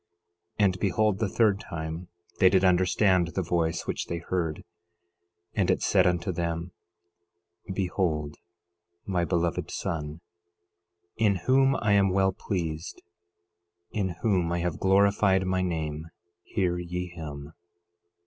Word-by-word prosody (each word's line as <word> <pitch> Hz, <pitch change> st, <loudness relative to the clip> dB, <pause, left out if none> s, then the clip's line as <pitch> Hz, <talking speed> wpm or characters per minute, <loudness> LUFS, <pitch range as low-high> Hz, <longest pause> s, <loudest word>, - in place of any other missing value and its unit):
11:6 105 Hz, -, +5 dB
And 95 Hz, -1 st, +1 dB
behold, 105 Hz, +1 st, +1 dB
the 110 Hz, -3 st, 0 dB
third 105 Hz, -2 st, +2 dB
time 80 Hz, -1 st, -6 dB, 0.3 s
they 95 Hz, -, +7 dB
did 95 Hz, 0 st, +3 dB
understand 90 Hz, 0 st, +3 dB
the 95 Hz, -, 0 dB
voice 85 Hz, 0 st, -1 dB
which -, -, -3 dB
they 85 Hz, -, -3 dB
heard; 85 Hz, -2 st, -3 dB, 0.9 s
and -, -, +1 dB
it -, -, +1 dB
said -, -, +4 dB
unto 90 Hz, +2 st, 0 dB
them: 85 Hz, 0 st, -3 dB, 1.0 s
11:7 95 Hz, -, -4 dB
Behold 85 Hz, -6 st, -1 dB, 0.7 s
my 90 Hz, -3 st, 0 dB
Beloved 85 Hz, -2 st, -1 dB
Son, 75 Hz, -1 st, -4 dB, 1.0 s
in 105 Hz, -3 st, +3 dB
whom 135 Hz, +1 st, +4 dB
I 105 Hz, -5 st, 0 dB
am 100 Hz, -1 st, +4 dB
well 95 Hz, 0 st, +2 dB
pleased, 85 Hz, -4 st, -4 dB, 0.9 s
in 95 Hz, -5 st, -2 dB
whom 90 Hz, -7 st, +2 dB
I 85 Hz, 0 st, 0 dB
have 85 Hz, -2 st, -2 dB
glorified 95 Hz, 0 st, +3 dB
my 95 Hz, 0 st, 0 dB
name—hear 85 Hz, +2 st, -3 dB
ye 90 Hz, +1 st, -4 dB
him. 75 Hz, -3 st, -8 dB
90 Hz, 130 wpm, -27 LUFS, 85-95 Hz, 1.0 s, they